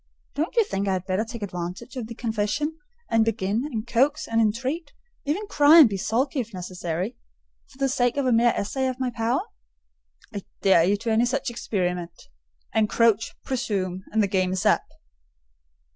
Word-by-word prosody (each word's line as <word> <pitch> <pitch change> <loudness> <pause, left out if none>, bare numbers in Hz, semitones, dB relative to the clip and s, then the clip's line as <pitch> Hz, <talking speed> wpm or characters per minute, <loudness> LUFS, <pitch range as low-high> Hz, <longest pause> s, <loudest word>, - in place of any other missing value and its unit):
Don't 315 +9 -2
you 465 - +5
think 200 - -3
I 190 - +2
had 185 -1 -3
better 190 +2 0
take 230 -1 -7
advantage 180 +6 -6
of 245 -4 -4
the 230 - -8
confession, 230 +7 -1 0.4
and 225 -1 +4
begin 220 0 -1
and 230 -7 -4
coax 270 +6 +1
and 230 0 +2
entreat—even 295 - -3
cry 305 -5 +6
and 310 -6 +10
be 205 - -3
sulky 250 +9 0
if 230 -4 -5
necessary—for 180 +8 -7
the 275 0 +1
sake 245 -1 +1
of 280 - +1
a 255 - +2
mere 235 +1 +4
essay 265 +6 -1
of 255 0 -3
my 255 -1 -1
power?" 235 +5 0 0.9
"I 200 - -4 0.2
dare 190 -4 +6
you 200 +3 +2
to 225 +2 -3
any 225 +2 +3
such 265 +1 -1
experiment. 180 -7 -3 0.4
Encroach, 220 0 +2
presume, 190 -7 -2
and 220 0 +2
the - - +2
game 185 -1 0
is 190 +3 -2
up." 210 - +3
225 Hz, 175 wpm, -25 LUFS, 195-260 Hz, 0.9 s, and